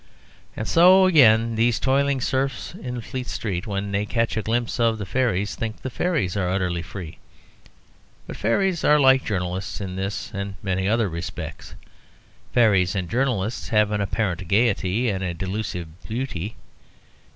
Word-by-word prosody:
And 110 Hz, -, -3 dB
so 185 Hz, +3 st, +6 dB
again 115 Hz, -10 st, +5 dB
these 115 Hz, +1 st, +2 dB
toiling 135 Hz, 0 st, +1 dB
serfs 130 Hz, 0 st, -1 dB
in 125 Hz, -1 st, -6 dB
Fleet 125 Hz, +1 st, -6 dB
Street, 95 Hz, -4 st, -3 dB
when 100 Hz, 0 st, -3 dB
they 100 Hz, +1 st, -1 dB
catch 115 Hz, +1 st, 0 dB
a 110 Hz, -, 0 dB
glimpse 115 Hz, +2 st, -1 dB
of 115 Hz, -1 st, +2 dB
the 105 Hz, -, -5 dB
fairies, 105 Hz, -3 st, 0 dB
think 110 Hz, -1 st, -5 dB
the 130 Hz, -, -4 dB
fairies 150 Hz, -, -1 dB
are 95 Hz, -3 st, 0 dB
utterly 90 Hz, -2 st, -1 dB
free. 90 Hz, -2 st, -8 dB, 1.1 s
But -, -, -7 dB
fairies 175 Hz, -, 0 dB
are 150 Hz, 0 st, +5 dB
like 130 Hz, -1 st, +5 dB
journalists 95 Hz, -2 st, -3 dB
in 95 Hz, -2 st, -5 dB
this 95 Hz, +2 st, -4 dB
and 100 Hz, -1 st, -4 dB
many 95 Hz, 0 st, 0 dB
other 115 Hz, -1 st, +2 dB
respects. 85 Hz, -1 st, -7 dB, 0.8 s
Fairies 100 Hz, -6 st, +3 dB
and 90 Hz, -3 st, -3 dB
journalists 120 Hz, -4 st, -1 dB
have 105 Hz, -3 st, +3 dB
an 105 Hz, -1 st, 0 dB
apparent 95 Hz, -3 st, -2 dB
gaiety 105 Hz, +2 st, +1 dB
and 95 Hz, -3 st, -1 dB
a 90 Hz, -2 st, -2 dB
delusive 95 Hz, -2 st, -4 dB, 0.2 s
beauty. 110 Hz, -4 st, -4 dB
110 Hz, 155 wpm, -23 LUFS, 95-125 Hz, 1.1 s, so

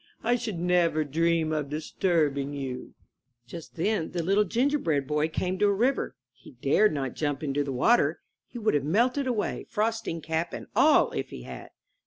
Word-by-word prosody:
I 240 Hz, +2 st, +3 dB
should 225 Hz, -6 st, -3 dB
never 170 Hz, -2 st, +2 dB
dream 165 Hz, +2 st, +1 dB
of 150 Hz, -2 st, -2 dB
disturbing 150 Hz, -2 st, 0 dB
you/' 135 Hz, -3 st, -6 dB, 0.5 s
Just 165 Hz, +6 st, -10 dB
then 175 Hz, -1 st, -1 dB
the 175 Hz, -2 st, -1 dB
Little 200 Hz, +4 st, +3 dB
Gingerbread 230 Hz, -, +1 dB
Boy 150 Hz, +2 st, +1 dB
came 185 Hz, +3 st, -2 dB
to 205 Hz, -, +4 dB
a -, -, +4 dB
river. 245 Hz, +7 st, 0 dB, 0.2 s
He 135 Hz, +1 st, -16 dB
dared 140 Hz, -, +3 dB
not 135 Hz, -4 st, -3 dB
jump 145 Hz, -1 st, -2 dB
into 145 Hz, 0 st, 0 dB
the 140 Hz, -, -4 dB
water 225 Hz, -, +3 dB, 0.3 s
(he -, -, -10 dB
would 220 Hz, -2 st, +1 dB
have 145 Hz, -2 st, +1 dB
melted 245 Hz, -, +1 dB
away, 225 Hz, -5 st, -2 dB
frosting 225 Hz, -5 st, -1 dB
cap 160 Hz, +1 st, -2 dB
and -, -, -6 dB
all -, -, +5 dB
if -, -, -4 dB
he -, -, -9 dB
had). 65 Hz, -1 st, -9 dB
165 Hz, 180 wpm, -27 LUFS, 145-210 Hz, 0.5 s, all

